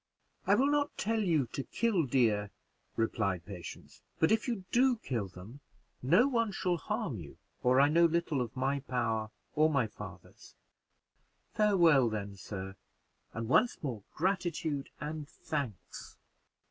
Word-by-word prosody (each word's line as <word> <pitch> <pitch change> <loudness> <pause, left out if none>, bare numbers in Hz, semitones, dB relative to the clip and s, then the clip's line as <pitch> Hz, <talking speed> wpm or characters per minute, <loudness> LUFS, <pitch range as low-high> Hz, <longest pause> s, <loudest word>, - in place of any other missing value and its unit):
"I - - +6
will 265 - +3
not 290 0 +1
tell 225 +1 0
you 165 -9 +2
to - - -2
kill 195 - 0
deer," 110 -6 +2 0.5
replied 100 -6 0
Patience; 95 -4 -9 0.2
"but 160 - +3
if 220 +2 +2
you 220 -7 -3
do 255 +1 +4
kill 120 - -3
them 95 +9 -12 0.4
no 175 - +5
one 230 -5 +1
shall 180 -2 0
harm 210 - -3
you 75 -4 -10 0.2
or 125 +1 +4
I 140 - +7
know 170 +3 +5
little 165 -4 +1
of 120 -1 -4
my 135 +2 +1
power 115 -5 -1 0.2
or 155 +1 +4
my 140 -6 +2
father's. 105 - -11 1.0
Farewell 170 - +5
then, 100 -2 -4
sir, 95 -1 -7 0.6
and 115 0 -4
once 220 - +3
more 120 -7 -3
gratitude 170 -5 -1
and 150 0 -5
thanks." 140 - -6
145 Hz, 145 wpm, -32 LUFS, 115-185 Hz, 1.0 s, I